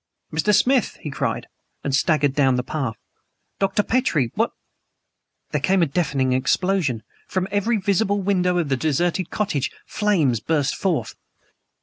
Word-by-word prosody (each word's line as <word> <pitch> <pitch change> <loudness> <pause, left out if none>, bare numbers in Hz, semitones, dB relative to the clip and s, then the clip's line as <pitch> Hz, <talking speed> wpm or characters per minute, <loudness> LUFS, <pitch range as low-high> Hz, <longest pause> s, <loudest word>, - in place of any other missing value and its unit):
"Mr. 160 +7 +2
Smith!" 250 +4 +3
he 150 - -5
cried - - -2 0.4
and 140 -2 0
staggered 145 -2 +2
down 135 -3 +3
the 125 - 0
path 130 -6 -3 0.6
"Dr. 195 +1 +2
Petrie! 165 - +1
What - - +1 0.5
" - - -50
There 150 - -1
came 185 +4 +3
a - - +5
deafening 135 -4 0
explosion. 140 - +1 0.2
From 185 0 -1
EVERY 210 +3 +1
visible 200 +1 +1
window 180 -2 +1
of 165 -5 0
the 135 - +1
deserted 170 +5 0
cottage 150 -10 -1 0.2
flames 165 - +1
burst 145 -2 0
forth! 155 - -1
165 Hz, 145 wpm, -22 LUFS, 140-195 Hz, 0.6 s, a